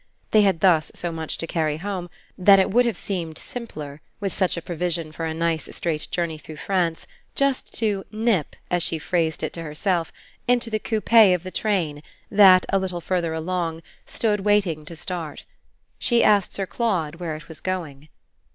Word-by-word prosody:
They 215 - +6
had 190 -5 +2
thus 165 -5 +4
so 175 - -3
much 160 -1 -4
to - - -4
carry 155 -2 -1
home 185 0 -4 0.3
that 195 +2 +7
it 190 - +2
would 245 +3 +4
have 225 -6 -1
seemed 170 -5 -4
simpler, 155 - -7 0.2
with 195 -2 -2
such 185 -2 0
a - - -3
provision 170 -2 -2
for 165 +1 -4
a 160 - -2
nice 165 -1 -1
straight 155 -3 -2
journey 170 -3 -2
through 155 - -10
France, 170 0 -1 0.3
just 275 -1 0
to 205 -4 0
"nip," 215 -7 0 0.2
as 175 -1 +2
she 165 - 0
phrased 160 0 -1
it - - -2
to 165 - -6
herself, 165 +2 -1 0.4
into 245 -2 +2
the 215 - 0
coupé 220 -3 +5
of 180 - -5
the 185 - -6
train 175 -10 -1 0.3
that, 190 -3 +7
a 195 - +3
little 185 -2 -3
further 170 -2 -1
along, 165 0 -2 0.2
stood 210 -2 0
waiting 195 -6 +1
to 165 - -9
start. 165 -3 -5 0.5
She 235 -1 +3
asked 205 -3 +4
Sir 195 - -1
Claude 175 -5 -1
where 165 -3 -4
it 160 +2 -10
was 160 -3 -11
going. 155 -6 -4
175 Hz, 185 wpm, -24 LUFS, 160-200 Hz, 0.5 s, that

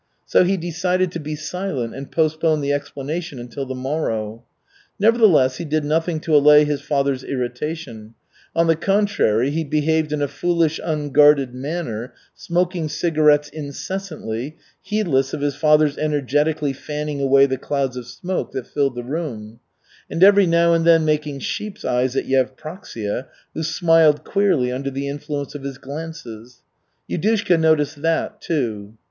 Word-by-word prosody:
So - - +4
he 190 +2 +1
decided 180 +1 -1
to 170 - -5
be 155 0 -5
silent 155 -6 -4
and 135 +1 -8
postpone 155 -1 +1
the 140 0 0
explanation 145 +2 -4
until 125 +3 -6
the 130 - -4
morrow. 120 -5 -3 0.6
Nevertheless 200 - +4
he - - -5
did 155 0 -1
nothing 160 +2 0
to 160 -1 +1
allay 150 +1 +7
his 145 -1 -2
father's 140 -3 0
irritation; 125 -3 -5 0.4
on 165 0 +3
the 165 0 +3
contrary, 185 - +1
he 160 +2 -1
behaved 155 +1 0
in 150 -1 -1
a - - +1
foolish, 170 +1 0
unguarded 145 -3 +3
manner, 130 -4 -5 0.2
smoking 175 -2 -1
cigarettes 150 -2 +2
incessantly, 150 - -6 0.2
heedless 160 -12 0
of - - -7
his 145 0 0
father's 150 -1 +3
energetically 150 0 0
fanning 150 +1 -5
away 135 0 +5
the 130 -2 -2
clouds 135 -2 -2
of 125 -1 -7
smoke 175 +10 -4
that 130 - -4
filled 140 -2 -1
the 120 - -5
room; 120 -6 -5 0.5
and 170 - +1
every 200 -1 +7
now 170 0 +4
and 165 0 +2
then 165 -1 +5
making 150 -2 0
sheep's 210 +8 -5
eyes 125 +1 0
at - - 0
Yevpraksia, 130 - -3 0.3
who 160 - -4
smiled 165 -2 +3
queerly 185 -11 +1
under 135 +2 -3
the 135 +1 -4
influence 145 0 -5
of 145 - -7
his 135 -1 -6
glances. 130 -6 -9 0.4
Yudushka 200 -2 +1
noticed 155 -2 +2
that, 165 0 -1
too. 110 -9 -3
150 Hz, 150 wpm, -21 LUFS, 135-165 Hz, 0.6 s, allay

